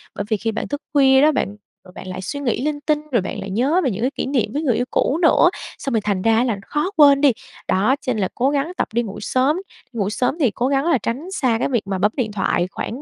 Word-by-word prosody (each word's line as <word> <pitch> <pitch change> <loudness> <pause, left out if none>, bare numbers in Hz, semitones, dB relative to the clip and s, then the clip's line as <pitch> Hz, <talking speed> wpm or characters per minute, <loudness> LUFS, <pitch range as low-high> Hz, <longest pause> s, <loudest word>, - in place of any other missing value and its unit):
bởi 200 - -3
vì 215 - +1
khi 225 +2 -2
bạn 220 - -4
thức 290 0 -4
khuya 265 -2 +5
đó 305 +2 +5
bạn, 205 -8 -2 0.3
rồi 180 - -15
bạn - - -9
lại 185 0 -5
suy 190 +10 -5
nghĩ 245 -4 -1
linh 300 -1 -1
tinh 300 0 +1
rồi 235 -5 +2
bạn 190 - -5
lại 195 - -6
nhớ 265 - +1
về 260 - +1
những 210 - -5
cái 255 +3 +1
kỷ - - -2
niệm 250 -5 -1
với 295 - -1
người 260 -8 +1
yêu 245 - 0
cũ 285 - +1
nữa, 335 +1 +5 0.3
xong 270 - -4
rồi 225 - +2
thành 200 -2 -1
ra 225 +3 +3
là 235 -5 -1
khó 300 +6 -1
quên 285 -2 +7
đi. 285 -2 +6 0.4
Đó, 210 +8 +2
cho 255 - -1
nên 215 - -2
là 190 - +1
cố 255 +2 +2
gắng 290 +3 -1
tập - - 0
đi 235 +1 +1
ngủ 205 -3 -7
sớm, 260 +8 +1 0.4
ngủ 205 -4 -1
sớm 250 +5 0
thì 260 -8 +3
cố 245 +4 -1
gắng 275 +1 +1
là 335 -4 +3
tránh 260 - -4
xa 255 -11 +1
cái - - 0
việc 235 -6 -1
mà 195 -1 -1
bấm 205 +3 +2
điện 230 -5 -1
thoại 180 -3 0
khoảng 245 +6 -5
250 Hz, 285 wpm, -20 LUFS, 210-285 Hz, 0.4 s, quên